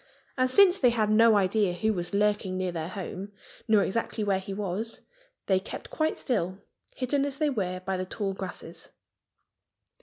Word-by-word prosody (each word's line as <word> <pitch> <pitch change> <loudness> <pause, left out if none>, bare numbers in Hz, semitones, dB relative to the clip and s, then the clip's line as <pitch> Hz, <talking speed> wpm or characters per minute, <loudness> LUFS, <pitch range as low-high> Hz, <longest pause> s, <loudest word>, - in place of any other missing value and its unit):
And 255 -1 +2
since 380 +6 +6
they 250 - +5
had 220 -3 +1
no 225 0 +6
idea 200 -1 +2
who 220 +5 0
was 175 -3 -3
lurking 205 -2 +1
near 185 -1 -1
their 165 -2 -4
home 190 +2 -6 0.3
nor 215 -2 +5
exactly 225 +1 -2
where 195 -2 +1
he 195 +1 -8
was, 205 +3 -3 0.4
they 190 -1 +3
kept 190 - -8
quite 315 0 0
still, 185 -8 -1 0.4
hidden 275 +2 0
as 280 -1 -3
they 300 -1 +1
were 185 -6 -2
by 190 0 -2
the 185 - -2
tall 195 0 -3
grasses. 180 -3 -7
205 Hz, 175 wpm, -28 LUFS, 185-230 Hz, 0.4 s, since